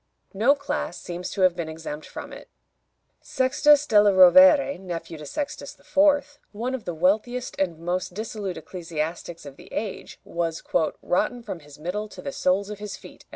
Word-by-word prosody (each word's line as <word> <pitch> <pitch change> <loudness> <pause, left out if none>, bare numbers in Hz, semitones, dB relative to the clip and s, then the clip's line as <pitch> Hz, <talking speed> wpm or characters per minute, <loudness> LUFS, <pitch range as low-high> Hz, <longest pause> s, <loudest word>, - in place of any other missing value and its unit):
No 230 +9 +4
class 280 - -4
seems 180 +1 -6
to 195 - -4
have 185 -2 +4
been 170 -2 -4
exempt 160 -1 -7
from - - -8
it. - - -11 0.7
Sextus 290 +3 +3
della 210 -5 +5
Rovere, 275 - +7
nephew 170 -3 -6
of 150 - -8
Sextus 290 - -5
IV., 290 0 +2
one 235 +5 -3
of 260 -4 -5
the 175 - -4
wealthiest 220 +9 0
and 180 -4 0
most 180 +2 -3
dissolute 210 -3 -4
ecclesiastics 165 0 -5
of 140 -1 -10
the - - -15
age, 210 -2 -5
was 165 -1 -3 0.4
"rotten 230 +6 0
from 200 -6 -6
his 145 -2 -15
middle 180 +7 -4
to - - -10
the 280 - -4
soles 195 -2 0
of 210 - -7
his 210 -1 -6
feet." - - -15
190 Hz, 170 wpm, -25 LUFS, 170-245 Hz, 0.7 s, Rovere